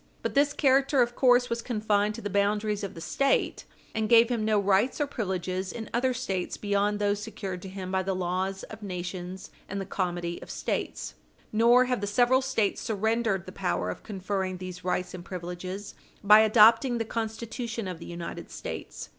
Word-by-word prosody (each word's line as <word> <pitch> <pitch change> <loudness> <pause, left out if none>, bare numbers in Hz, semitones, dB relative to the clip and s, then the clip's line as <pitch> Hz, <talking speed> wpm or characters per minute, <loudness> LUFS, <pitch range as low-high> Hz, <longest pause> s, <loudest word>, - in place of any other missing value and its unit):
But - - -1
this 285 +1 +4
character, 270 -1 +4
of 240 0 -4
course, 245 -1 +5
was 235 -1 -2
confined 210 -3 0
to 230 - -7
the 205 - -2
boundaries 205 +1 +1
of 195 - -5
the 165 - -8
State, 275 +11 0 0.3
and 220 -1 -1
gave 230 0 +7
him 235 -3 0
no 215 -1 +3
rights 200 +7 +2
or 295 - +2
privileges 190 -6 -3
in 225 -2 -7
other 250 +2 +2
States 200 -8 -3
beyond 205 0 +1
those 205 0 0
secured 195 -4 -5
to 190 - -8
him 185 -1 -6
by 190 0 +1
the 190 0 -2
laws 185 +2 -2
of 220 0 -10
nations 180 -1 -6 0.2
and 200 - -3
the 195 - -4
comity 175 -2 -3
of - - -11
States. - - -3 0.4
Nor 235 +3 +6
have 250 -3 -1
the 205 - -2
several 245 +5 +4
States 255 -6 0
surrendered 220 -3 0
the 185 - -8
power 90 - -1
of - - -8
conferring 190 -2 -3
these 185 0 -8
rights 180 0 -1
and 180 -1 -7
privileges 185 +2 -6 0.3
by 210 +1 +8
adopting 225 +3 +6
the 225 - -1
Constitution 230 0 -4
of 180 -3 -5
the - - -9
United 170 -1 -6
States. - - -7
205 Hz, 190 wpm, -28 LUFS, 185-230 Hz, 0.4 s, by